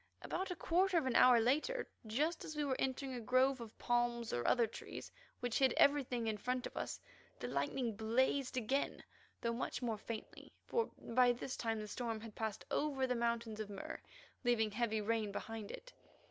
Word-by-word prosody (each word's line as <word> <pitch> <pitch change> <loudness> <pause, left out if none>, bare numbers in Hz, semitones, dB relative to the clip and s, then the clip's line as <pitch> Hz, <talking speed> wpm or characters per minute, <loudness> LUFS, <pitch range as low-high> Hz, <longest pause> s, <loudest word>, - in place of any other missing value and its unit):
About 380 - -2
a 360 - -2
quarter 360 +3 +2
of 315 - +2
an 260 - 0
hour 250 -2 +8
later, 300 - +1 0.2
just 300 +10 0
as 310 - -6
we 300 - 0
were 275 -2 +1
entering 265 0 -1
a 245 - -3
grove 255 +2 +3
of 225 -1 -9
palms 240 -1 +1
or 120 - 0
other 240 -2 +5
trees 225 - -8 0.3
which 245 -2 0
hid 265 -3 +5
everything 260 -5 +4
in 220 -1 0
front 250 +3 -1
of - - -7
us, - - -3 0.4
the - - -3
lightning 240 -5 -1
blazed 255 +5 +1
again, 265 +4 0 0.4
though 235 0 0
much 250 +1 -3
more 225 -3 -1
faintly, 220 0 -7
for 465 -1 +1
by 245 +1 +4
this 245 +2 -4
time 225 -2 -1
the 210 - -5
storm 225 0 -3
had 225 -1 -8
passed 220 -1 -3
over 280 -3 +1
the 250 - +1
Mountains 235 -2 -1
of 215 -1 -4
Mur, 200 -1 -6 0.4
leaving 225 -3 +3
heavy 220 0 0
rain 215 -1 0
behind 220 0 -5
it. - - -9
240 Hz, 190 wpm, -37 LUFS, 225-265 Hz, 0.4 s, hour